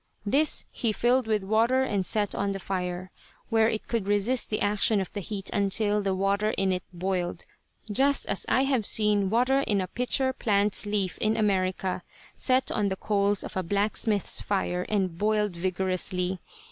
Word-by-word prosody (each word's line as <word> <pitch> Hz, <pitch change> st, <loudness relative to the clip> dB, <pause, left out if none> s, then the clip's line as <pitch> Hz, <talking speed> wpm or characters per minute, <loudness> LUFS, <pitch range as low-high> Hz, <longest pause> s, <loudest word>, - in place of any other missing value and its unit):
This 285 Hz, +8 st, +2 dB
he 230 Hz, -, -1 dB
filled 245 Hz, +3 st, +1 dB
with 215 Hz, -2 st, 0 dB
water 230 Hz, +6 st, +2 dB
and 205 Hz, -7 st, -1 dB
set 205 Hz, +2 st, 0 dB
on 200 Hz, 0 st, -1 dB
the 195 Hz, -, -5 dB
fire, 185 Hz, -1 st, -4 dB, 0.4 s
where 225 Hz, -1 st, +3 dB
it 220 Hz, -, -2 dB
would 220 Hz, -4 st, 0 dB
resist 205 Hz, +5 st, +1 dB
the 215 Hz, -, -1 dB
action 205 Hz, +1 st, +2 dB
of 190 Hz, -, -5 dB
the 205 Hz, -, -3 dB
heat 195 Hz, 0 st, -5 dB
until 205 Hz, +1 st, +2 dB
the 195 Hz, -1 st, -1 dB
water 200 Hz, +3 st, 0 dB
in 190 Hz, -1 st, +1 dB
it 180 Hz, -, -2 dB
boiled, 180 Hz, -1 st, -3 dB, 0.5 s
just 275 Hz, +6 st, +3 dB
as 200 Hz, -, -2 dB
I 260 Hz, -, +3 dB
have 260 Hz, -6 st, 0 dB
seen 210 Hz, -2 st, +3 dB
water 250 Hz, +5 st, +2 dB
in 210 Hz, -7 st, 0 dB
a 185 Hz, -, -1 dB
pitcher 260 Hz, +3 st, 0 dB
plant's 205 Hz, -3 st, +1 dB
leaf 200 Hz, -3 st, -2 dB
in 215 Hz, +1 st, +1 dB
America 190 Hz, -3 st, 0 dB, 0.3 s
set 260 Hz, 0 st, +1 dB
on 210 Hz, -3 st, 0 dB
the 190 Hz, -, -1 dB
coals 200 Hz, 0 st, 0 dB
of -, -, -8 dB
a 185 Hz, -, 0 dB
blacksmith's 205 Hz, +2 st, 0 dB
fire 180 Hz, -3 st, -2 dB
and 185 Hz, -5 st, -1 dB
boiled 210 Hz, -2 st, +1 dB
vigorously. 185 Hz, 0 st, -1 dB
205 Hz, 175 wpm, -27 LUFS, 190-220 Hz, 0.5 s, where